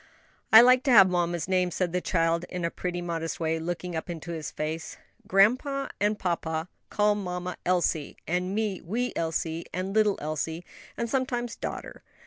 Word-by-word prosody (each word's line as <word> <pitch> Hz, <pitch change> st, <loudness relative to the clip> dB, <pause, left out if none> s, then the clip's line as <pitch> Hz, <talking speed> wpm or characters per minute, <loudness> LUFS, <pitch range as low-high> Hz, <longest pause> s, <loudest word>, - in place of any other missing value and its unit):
"I 220 Hz, -, +11 dB
like 250 Hz, +1 st, +6 dB
to 270 Hz, -, +3 dB
have 195 Hz, -5 st, +8 dB
mamma's 175 Hz, -1 st, 0 dB
name," 185 Hz, -1 st, +2 dB
said 175 Hz, 0 st, -2 dB
the 180 Hz, -, 0 dB
child, 165 Hz, -1 st, +1 dB
in 180 Hz, -2 st, -3 dB
a 170 Hz, -, -1 dB
pretty, 175 Hz, -1 st, -4 dB
modest 165 Hz, -1 st, -3 dB
way, 160 Hz, 0 st, 0 dB
looking 175 Hz, +1 st, -4 dB
up 160 Hz, -, -4 dB
into 170 Hz, 0 st, -6 dB
his 160 Hz, -3 st, -4 dB
face. 160 Hz, +2 st, -5 dB, 0.3 s
"Grandpa 255 Hz, +8 st, +3 dB
and 210 Hz, +1 st, +1 dB
papa 165 Hz, -2 st, -2 dB, 0.2 s
call 210 Hz, 0 st, +3 dB
mamma 180 Hz, -3 st, -4 dB
Elsie, 175 Hz, -4 st, 0 dB
and 180 Hz, +3 st, -1 dB
me 210 Hz, -4 st, -1 dB
wee 240 Hz, +8 st, -2 dB
Elsie 165 Hz, 0 st, -2 dB
and 185 Hz, +2 st, -3 dB
little 210 Hz, -2 st, +3 dB
Elsie, 160 Hz, +3 st, -3 dB, 0.3 s
and 235 Hz, -, -1 dB
sometimes 245 Hz, -1 st, -1 dB
daughter. -, -, -6 dB
180 Hz, 170 wpm, -27 LUFS, 165-210 Hz, 0.3 s, I